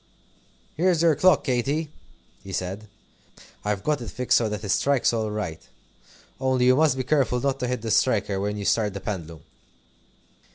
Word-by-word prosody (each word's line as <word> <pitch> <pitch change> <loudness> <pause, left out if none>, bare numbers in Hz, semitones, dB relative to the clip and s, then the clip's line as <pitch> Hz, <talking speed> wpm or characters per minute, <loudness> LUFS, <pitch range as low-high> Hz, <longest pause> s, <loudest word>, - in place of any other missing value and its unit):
"Here's 170 0 +2
your 165 -2 +5
clock, 185 +6 +4
Katy," 140 +4 -1 0.5
he 95 - -9
said. 95 +3 -4 0.8
"I've 105 -2 -2
got 150 -3 0
it 115 - -6
fixed 125 +4 0
so 115 -2 +2
that 105 0 -5
it 100 - -5
strikes 135 +4 +2
all 110 -2 -1
right. 105 -7 -4 0.8
Only 130 -1 +1
you 130 0 +5
must 150 -2 +3
be 130 - -1
careful 130 -2 +1
not 135 +1 -1
to 125 - -2
hit 125 -2 -3
the 115 - -2
striker 100 -6 +1
when 105 +1 -2
you 100 - -5
start 105 -3 +1
the - - -3
pendulum." 85 -6 -6
120 Hz, 175 wpm, -24 LUFS, 105-135 Hz, 0.8 s, your